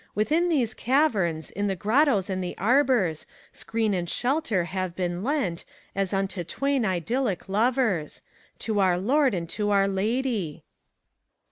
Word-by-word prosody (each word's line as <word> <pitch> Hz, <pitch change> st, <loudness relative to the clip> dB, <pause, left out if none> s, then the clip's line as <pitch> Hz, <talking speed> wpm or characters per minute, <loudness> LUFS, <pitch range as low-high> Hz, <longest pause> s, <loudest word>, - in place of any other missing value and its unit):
Within 315 Hz, +12 st, +2 dB
these 250 Hz, -9 st, +1 dB
caverns, 215 Hz, -, +1 dB
in 205 Hz, +1 st, -2 dB
the 195 Hz, -, -1 dB
grottos 215 Hz, -, +2 dB
and 185 Hz, -2 st, -2 dB
the 180 Hz, -, -5 dB
arbors. 235 Hz, -, +2 dB, 0.3 s
Screen 225 Hz, -2 st, -1 dB
and 175 Hz, -2 st, -2 dB
shelter 245 Hz, -, 0 dB
have 185 Hz, 0 st, -4 dB
been 175 Hz, 0 st, -2 dB
lent, 240 Hz, -, -1 dB, 0.3 s
as 195 Hz, -1 st, -1 dB
unto 195 Hz, -2 st, -1 dB
twain 275 Hz, -, -1 dB
idyllic 190 Hz, -, -1 dB
lovers. 215 Hz, -, 0 dB, 0.4 s
To 215 Hz, -2 st, -1 dB
our 185 Hz, -2 st, +3 dB
Lord 260 Hz, +5 st, +2 dB
and 170 Hz, -1 st, -3 dB
to 210 Hz, +2 st, -2 dB
our 200 Hz, -1 st, +3 dB
Lady. 205 Hz, -, -1 dB
205 Hz, 140 wpm, -26 LUFS, 185-255 Hz, 0.4 s, our